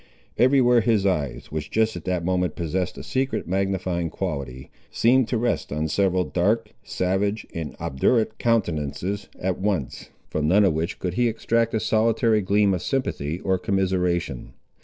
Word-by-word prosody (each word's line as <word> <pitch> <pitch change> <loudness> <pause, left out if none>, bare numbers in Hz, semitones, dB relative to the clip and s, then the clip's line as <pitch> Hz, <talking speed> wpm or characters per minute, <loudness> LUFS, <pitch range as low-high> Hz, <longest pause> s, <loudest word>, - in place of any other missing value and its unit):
Every 130 +2 +4
where 120 -1 +5
his 110 -3 +2
eyes, 75 -9 -1
which 75 -1 -4
just 110 0 +1
at - - -8
that 90 -2 -1
moment 90 -3 0
possessed 90 +2 -2
a - - -7
secret 130 -7 -2
magnifying 95 -2 -1
quality, 65 -3 -5 0.2
seemed 125 +1 +3
to 120 - 0
rest 120 +1 -1
on 75 +2 -1
several 95 0 +2
dark, 105 +6 0
savage, 100 +3 -1
and 80 -2 -5
obdurate 110 - +1
countenances 95 -3 -1
at 95 -1 -2
once, 95 -9 -2 0.2
from 75 0 -1
none 100 +5 +5
of 95 - +3
which 80 +4 -2
could 90 -1 -3
he 120 +4 +2
extract 115 0 0
a - - +2
solitary 110 0 +2
gleam 100 +1 +2
of 90 - -2
sympathy 85 - -2
or 95 -1 0
commiseration. 90 - -1
95 Hz, 160 wpm, -24 LUFS, 85-110 Hz, 0.2 s, where